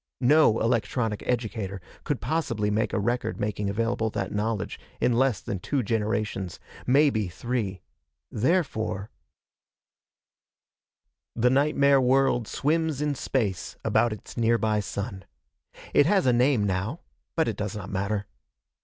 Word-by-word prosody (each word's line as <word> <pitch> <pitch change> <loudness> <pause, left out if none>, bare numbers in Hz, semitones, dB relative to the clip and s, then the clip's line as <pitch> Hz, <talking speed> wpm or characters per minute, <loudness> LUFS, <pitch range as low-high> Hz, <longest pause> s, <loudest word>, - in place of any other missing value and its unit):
No 130 -3 +5
electronic 115 -1 0
educator 110 -5 -2 0.3
could 145 - -1
possibly 115 -10 -1
make 110 +1 0
a - - -1
record 120 +4 -1
making 105 -1 -1
available 115 +1 0
that - - -3
knowledge 105 -1 -2 0.2
in 125 - +2
less 125 -3 +2
than 95 - -4
two 135 +6 -1
generations 105 -4 -2 0.3
maybe 130 -6 +3
three. 100 0 -3 0.5
Therefore 110 - 0 2.2
The 125 +1 +3
nightmare 140 0 +4
world 130 -2 +3
swims 160 -1 0
in 150 -1 0
space 115 -8 -2
about 120 - +2
its 110 - -8
nearby 115 -2 +2
sun. 100 0 -5 0.7
It 145 - +5
has 195 -1 +3
a 125 - +4
name 125 -2 +3
now, 100 - -2 0.3
but 160 - +2
it 110 - -1
does 105 +1 -4
not 100 -2 -6
matter. 100 +1 -1
115 Hz, 125 wpm, -26 LUFS, 105-130 Hz, 2.2 s, No